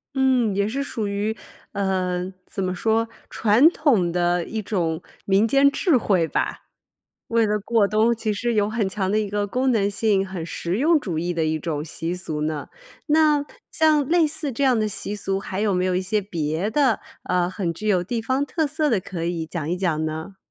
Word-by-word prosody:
嗯， 255 -6 +2
也 200 +1 +1
是 270 +5 -2
属 225 -6 -3
于， 205 +2 -1 0.4
呃， 185 -2 -1 0.2
怎 195 - -4
么 185 0 -1
说， 225 +4 +1 0.2
传 230 +8 +5
统 240 - +2
的 175 0 +1
一 220 -1 -4
种 175 -5 -1 0.2
民 200 +3 +3
间 275 +4 +5
智 285 +1 +2
慧 185 -8 +1
吧。 - - -2 0.6
为 230 -1 +2
了 210 0 0
过 210 0 +2
冬 220 +3 +2
其 220 -1 -2
实 235 +2 -1
有 205 -1 +2
很 215 -3 -1
强 190 0 -2
的 215 - +2
一 210 -2 -2
个 205 0 -1
功 255 +5 0
能 205 -3 +2
性， 200 -2 +1
很 185 -3 -5
实 170 +3 -3
用 310 +4 +4
主 175 - -3
义 175 +2 -1
的 165 -2 0
一 155 0 0
种 150 -2 -3
习 165 +2 -4
俗 155 -4 -5
呢。 155 -1 -3 0.4
那 300 -1 +3 0.3
像 305 -4 +3
类 340 -1 +4
似 295 -2 0
这 265 +4 -2
样 255 -4 +4
的 215 - +1
习 205 0 -4
俗， 195 -1 -2
还 195 0 -5
有 210 -2 +2
没 180 0 +1
有 185 -1 +1
一 185 - +1
些 210 +3 0
别 170 +1 -2
的， 265 -6 +2 0.2
呃， 180 -1 +1
很 185 -2 -2
具 215 +6 -6
有 185 -4 +3
地 230 +6 -2
方 260 +5 0
特 315 +2 -1
色 300 +1 0
的 215 - +2
可 175 -2 -5
以 170 -2 -2
讲 160 -2 -4
一 180 - -1
讲 165 -4 0
呢？ 160 +5 -5
205 Hz, 225 characters per minute, -23 LUFS, 180-235 Hz, 0.6 s, 传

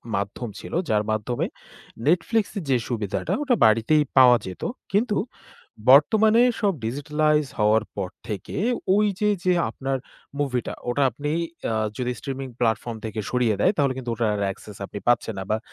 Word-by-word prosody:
মাধ্যম 100 +4 -3
ছিল, - - -9 0.2
যার 105 -1 +2
মাধ্যমে 110 +3 -1 0.6
Netflix 205 +6 +2
এ - - 0
যে 130 - +4
সুবিধাটা, 105 -5 -2
ওটা 255 -4 +2
বাড়িতেই 115 +8 +4
পাওয়া 125 -2 +8
যেত। 95 - -8 0.3
কিন্তু 210 +1 +1 0.7
বর্তমানে 220 - +6 0.2
সব 200 -2 +2
digitalized 150 +3 0
হওয়ার 105 +1 +4
পর 95 -3 -3 0.2
থেকে 105 -4 -5 0.4
ওই 210 0 +4
যে, 210 0 +2 0.2
যে 180 - +4 0.2
আপনার 135 +3 -3 0.4
মুভিটা, 125 -4 -1 0.2
ওটা 140 +3 +1
আপনি 145 +5 -4 0.4
আ - - 0 0.2
যদি 125 -1 -1
streaming 135 -2 -5
platform 115 0 0
থেকে 110 0 -4
সরিয়ে 120 -4 +1
দেয়, - - +5
তাহলে 140 -2 +2
কিন্তু 120 -2 -4
ওটা 115 -1 0 0.2
access 100 +1 -11
আপনি 100 - -7
পাচ্ছেন 120 -2 +2
না। - - -3
বা 110 - +2
125 Hz, 155 wpm, -24 LUFS, 110-150 Hz, 0.7 s, পাওয়া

